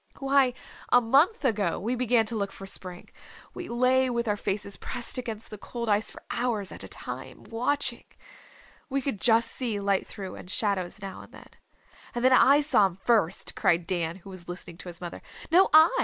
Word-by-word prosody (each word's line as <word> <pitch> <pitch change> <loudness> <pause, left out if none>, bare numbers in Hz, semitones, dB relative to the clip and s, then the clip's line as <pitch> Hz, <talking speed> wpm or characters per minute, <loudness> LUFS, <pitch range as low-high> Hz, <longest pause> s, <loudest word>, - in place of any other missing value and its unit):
Why, 270 -2 +2 0.3
a 245 - +6
month 280 - +3
ago 205 -8 0
we 230 +6 -2
began 245 -2 +2
to 225 +1 -3
look 200 -2 -2
for 195 - -10
Spring. 185 -2 -4 0.4
We 355 - -7
lay 255 +2 +2
with 235 -1 -2
our 210 - +1
faces 200 0 -3
pressed 250 +1 -1
against 225 -3 -7
the 215 - -8
cold 235 +1 -5
ice 210 +1 +3
for - - -12
hours 225 -6 -1
at - - -10
a - - -7
time, - - -6
watching. 250 +2 -1 0.8
We 275 0 -1
could 245 -8 -3
just 230 0 +4
see 230 -5 -1
light 200 -1 0
through, 195 -2 -8
and 180 - -11
shadows 195 -1 -2
now 195 -1 -7
and - - -15
then." - - -14 0.7
"And 240 +1 -1
then 260 - +6
I 280 +3 +6
saw 285 -9 +5
him 180 - -10
first," 200 -3 +2
cried 170 0 +1
Dan, 170 -2 -2
who 190 +1 -12
was 175 -2 -10
listening 175 -1 -7
to 180 - -8
his 170 0 -6
mother. 175 -1 -7 0.3
"No, 370 +3 +5
I!" 315 +1 +8
225 Hz, 200 wpm, -27 LUFS, 195-255 Hz, 0.8 s, I